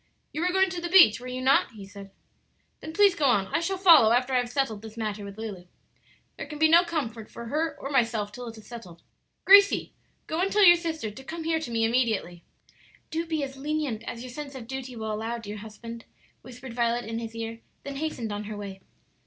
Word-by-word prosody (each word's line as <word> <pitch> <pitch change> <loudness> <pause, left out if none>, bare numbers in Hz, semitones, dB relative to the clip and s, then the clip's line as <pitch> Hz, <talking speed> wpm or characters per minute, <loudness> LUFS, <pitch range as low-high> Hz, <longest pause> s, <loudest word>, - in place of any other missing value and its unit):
"You 310 - -3
were 360 +1 +1
going 380 0 +2
to 355 -1 -4
the 345 - -3
beach, 340 - +7
were 250 - -9
you 255 0 -5
not?" 265 -2 +3
he 205 -3 -10
said. 200 0 -11 0.7
"Then 315 - -8
please 405 +2 +5
go 310 -6 -1
on; 225 -7 +3
I - - 0
shall 380 +3 -2
follow 330 - +7
after 250 +2 +2
I - - +4
have 245 -1 -2
settled 245 -6 -1
this 220 0 -11
matter 215 -2 -3
with 200 0 -9
Lulu. 205 -5 -7 0.7
There - - -6
can 300 - -8
be 315 +1 +5
no 335 +2 +6
comfort 240 -11 -4
for 235 - -9
her 310 +7 -2
or 275 - -6
myself 230 -6 +1
till 245 +3 -8
it 225 -1 -9
is 220 - -14
settled. 185 -9 -11 0.4
Gracie, 400 +1 +6 0.3
go 320 +2 -2
and 390 +1 0
tell 415 -1 +5
your 345 -1 +9
sister 320 -9 -4
to 265 +6 -12
come 325 +4 -6
here 325 0 0
to 315 - -6
me 225 -1 +1
immediately." 225 -8 0 0.7
"Do 330 +1 -2
be 315 -3 -1
as 270 0 -6
lenient 290 -5 -2
as 235 - -6
your 255 - -8
sense 280 +1 -8
of 250 -3 -8
duty 260 0 -6
will 220 -1 -4
allow, 225 +2 -3
dear 210 -2 -7
husband," 230 +2 -9 0.4
whispered 250 0 -10
Violet 235 0 0
in 225 +1 -4
his 230 0 -7
ear, 225 0 -5 0.2
then 280 -1 -6
hastened 275 -8 -3
on 205 +1 -5
her 210 0 -6
way. 195 -2 -8
245 Hz, 230 wpm, -27 LUFS, 220-315 Hz, 0.7 s, your